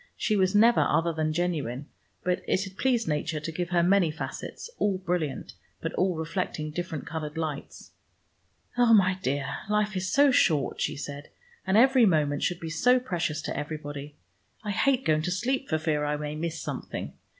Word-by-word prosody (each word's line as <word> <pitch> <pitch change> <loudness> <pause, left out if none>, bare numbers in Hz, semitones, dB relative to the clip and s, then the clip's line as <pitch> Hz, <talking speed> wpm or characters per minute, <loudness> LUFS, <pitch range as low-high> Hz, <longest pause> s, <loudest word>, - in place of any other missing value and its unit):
She 215 - +1
was 190 0 +2
never 230 +3 +6
other 165 0 +2
than 155 0 0
genuine, 155 -6 -2 0.4
but 180 0 0
it 185 - +1
had 190 -1 -9
pleased 240 -1 +1
Nature 155 +1 -1
to 155 +2 -5
give 175 +1 -3
her 175 -2 +3
many 185 -1 +4
facets, 155 +2 -6
all 200 -2 +1
brilliant, 170 -6 -3 0.3
but - - -4
all 185 -1 +1
reflecting 160 -1 -3
different 160 -2 -4
colored 155 -2 -5
lights. 155 -3 -5 0.9
"Oh, 235 -2 +7
my 185 -2 +3
dear, 140 -1 -2
life 210 0 +1
is 185 0 -2
so 285 0 +5
short," 155 - +2
she - - 0
said, 145 0 -7 0.4
"and 190 +2 +3
every 255 -1 +6
moment 150 -5 +2
should 175 -1 0
be 165 - -6
so 250 +10 +4
precious 165 - -2
to - - -3
everybody. 145 -1 -6 0.5
I 210 - -2
hate 265 +5 +2
going 155 -1 +3
to 170 - -2
sleep, 255 +9 -1
for 155 - +2
fear 155 -2 0
I 150 0 0
may 150 0 -4
miss 165 +1 -3
something. - - -5
170 Hz, 185 wpm, -27 LUFS, 150-195 Hz, 0.9 s, Oh